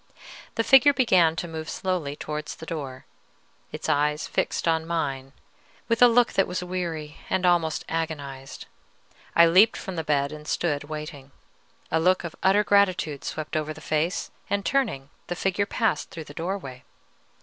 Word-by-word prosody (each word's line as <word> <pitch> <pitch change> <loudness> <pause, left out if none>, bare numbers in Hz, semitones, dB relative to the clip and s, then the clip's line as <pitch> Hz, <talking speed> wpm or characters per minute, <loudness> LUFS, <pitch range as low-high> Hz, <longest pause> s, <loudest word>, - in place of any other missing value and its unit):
The 230 - +1
figure 270 +4 +7
began 185 -12 +4
to 175 - -3
move 160 -1 -6
slowly 175 -7 -2
towards 150 0 -5
the - - -10
door, 140 -6 -6 0.7
its - - -5
eyes 150 +1 +1
fixed - - -1
on 160 -1 +1
mine 135 -5 -2 0.6
with 230 0 0
a 245 - +10
look 240 0 +3
that 195 - +2
was 180 0 -3
weary 170 -4 -4
and 190 -1 +1
almost 170 -3 +2
agonized. 145 -5 -5 0.7
I 170 - +8
leaped 190 +7 +5
from 190 -2 -6
the 160 - -1
bed 140 -2 +1
and 150 0 -9
stood 145 -4 -1
waiting. 150 -2 -7 0.6
A 160 - +2
look 185 +3 +3
of 170 -1 -6
utter 200 +2 +4
gratitude 185 -8 +2
swept 155 0 -5
over 155 0 -1
the - - -11
face, 155 +4 -1 0.2
and, 200 -1 -1
turning, 215 - 0 0.2
the 175 - -3
figure 195 +2 0
passed 225 -1 0
through 160 - -7
the 145 - -12
doorway. 165 -7 -5
165 Hz, 165 wpm, -25 LUFS, 150-185 Hz, 0.7 s, a